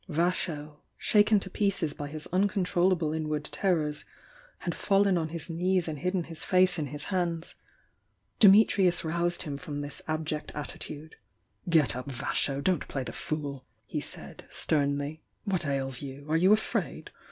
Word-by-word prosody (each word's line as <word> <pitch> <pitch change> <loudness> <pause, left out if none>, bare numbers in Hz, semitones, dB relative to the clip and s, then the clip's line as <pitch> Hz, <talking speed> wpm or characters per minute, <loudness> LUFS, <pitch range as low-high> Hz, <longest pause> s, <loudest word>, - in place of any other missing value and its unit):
Vasho, 155 -3 -1 0.2
shaken 210 0 +4
to - - -3
pieces 195 -8 0
by 145 - -5
his 155 +1 -6
uncon 195 0 +2
trollable 175 -3 +2
inward 155 -1 -2
terrors, 155 -7 0 0.5
had 175 - -3
fallen 200 -1 +3
on 160 -2 0
his 165 0 -6
knees 180 +1 +1
and 155 -3 -4
hidden 180 +3 0
his 165 -1 -6
face 185 -1 +4
in 150 - -1
his 145 +1 -4
hands. 170 -2 -1 0.9
Dimitrius 195 -3 +6
roused 170 +2 0
him 145 -2 -4
from 145 -2 -5
this 145 0 -6
abject 155 -1 -2
attitude. 150 +1 -6 0.5
"Get 155 -7 +4
up, 125 +2 -5
Vasho! 140 +1 0
Don't 180 -3 +1
play 135 - -3
the - - -6
fool!" 145 -4 -4 0.2
he - - -3
said, - - -5
sternly. 145 +1 0 0.2
"What 185 -7 0
ails 135 -2 -1
you? 140 0 -8
Are - - +3
you 185 +4 +5
afraid? 215 +1 0
160 Hz, 155 wpm, -29 LUFS, 145-180 Hz, 0.9 s, Dimitrius